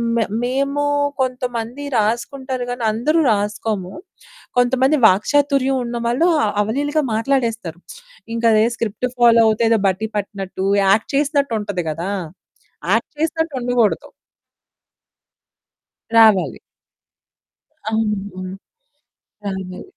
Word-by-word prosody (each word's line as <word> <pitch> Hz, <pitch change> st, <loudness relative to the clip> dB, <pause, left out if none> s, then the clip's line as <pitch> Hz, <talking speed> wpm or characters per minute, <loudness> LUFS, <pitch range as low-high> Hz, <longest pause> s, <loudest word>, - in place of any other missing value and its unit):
మ -, -, +2 dB, 0.2 s
మేము 275 Hz, +3 st, 0 dB, 0.4 s
కొంతమంది 250 Hz, 0 st, -3 dB
రాసుకుంటారు 250 Hz, +4 st, -1 dB
గాని, 245 Hz, -1 st, -4 dB
అందరూ 280 Hz, +10 st, +1 dB
రాసుకోము. 205 Hz, -2 st, -2 dB, 0.7 s
కొంతమంది 260 Hz, +4 st, +3 dB
వాక్చాతుర్యం 270 Hz, +6 st, +2 dB
ఉన్నవాళ్ళు 240 Hz, +6 st, 0 dB, 0.3 s
అవలీలగా 290 Hz, +8 st, 0 dB
మాట్లాడేస్తారు. 225 Hz, -7 st, -1 dB, 0.6 s
ఇంక 230 Hz, -, -4 dB
అదే 215 Hz, 0 st, +4 dB
స్క్రిప్ట్ 230 Hz, +2 st, -2 dB
ఫాలో 235 Hz, -1 st, +6 dB
అవుతే 220 Hz, +1 st, +2 dB
ఏదో 225 Hz, -1 st, +3 dB
బట్టి 195 Hz, +3 st, -1 dB
పట్టినట్టు 195 Hz, -2 st, -4 dB, 0.2 s
యాక్ట్ 200 Hz, +3 st, +3 dB
చేసినట్టుంటది 235 Hz, -, 0 dB
గదా! 170 Hz, +5 st, -4 dB, 0.8 s
యాక్ట్ 225 Hz, -, 0 dB
చేసినట్టు 320 Hz, 0 st, -1 dB
ఉండకూడదు. 240 Hz, -3 st, +1 dB, 2.1 s
రావాలి. 220 Hz, -5 st, +4 dB, 1.3 s
అవును. 205 Hz, -4 st, -2 dB, 1.0 s
అవును. 190 Hz, -2 st, -5 dB
230 Hz, 85 wpm, -19 LUFS, 210-265 Hz, 2.1 s, ఫాలో